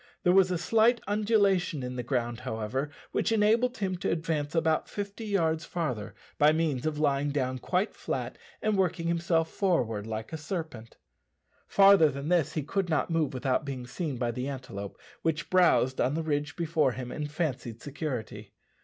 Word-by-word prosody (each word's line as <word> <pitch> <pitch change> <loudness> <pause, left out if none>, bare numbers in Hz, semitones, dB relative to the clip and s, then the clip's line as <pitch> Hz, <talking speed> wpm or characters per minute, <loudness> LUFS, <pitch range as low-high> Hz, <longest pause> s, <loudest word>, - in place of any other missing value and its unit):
There 180 - +4
was 190 -1 +5
a 180 - 0
slight 225 +7 +3
undulation 200 - +2
in 125 0 -4
the 125 - -2
ground, 120 -1 -2
however, 125 +3 -3 0.2
which - - 0
enabled 225 +4 +3
him 190 -3 -1
to 180 - -2
advance 160 -2 -1
about 160 -1 +1
fifty 205 +2 -5
yards 165 -5 +1
farther, 115 - -3 0.2
by 150 +1 +6
means 155 -4 0
of 155 -1 -2
lying 145 -1 +1
down 130 -3 -1
quite 185 - 0
flat - - -4 0.2
and 215 -1 +2
working 180 -3 0
himself 170 -1 +1
forward 115 - 0
like 110 +5 -5
a - - -2
serpent. 150 - -6 0.7
Farther 195 -5 +6
than 140 +2 -5
this 175 -5 +2
he 155 - -2
could 185 +5 -1
not 160 +2 0
move 160 -3 +1
without 130 +1 0
being 135 -3 -5
seen 145 +1 -4
by 120 -1 -1
the 125 +3 -4
antelope, 125 -8 -6 0.2
which 160 -2 -1
browsed 175 -8 +4
on 135 - +1
the 165 - -1
ridge 145 -1 -1
before 160 -6 +1
him 125 -1 -6
in 150 -1 -3
fancied 135 -7 -3
security. 120 -9 -5
155 Hz, 175 wpm, -29 LUFS, 130-180 Hz, 0.7 s, by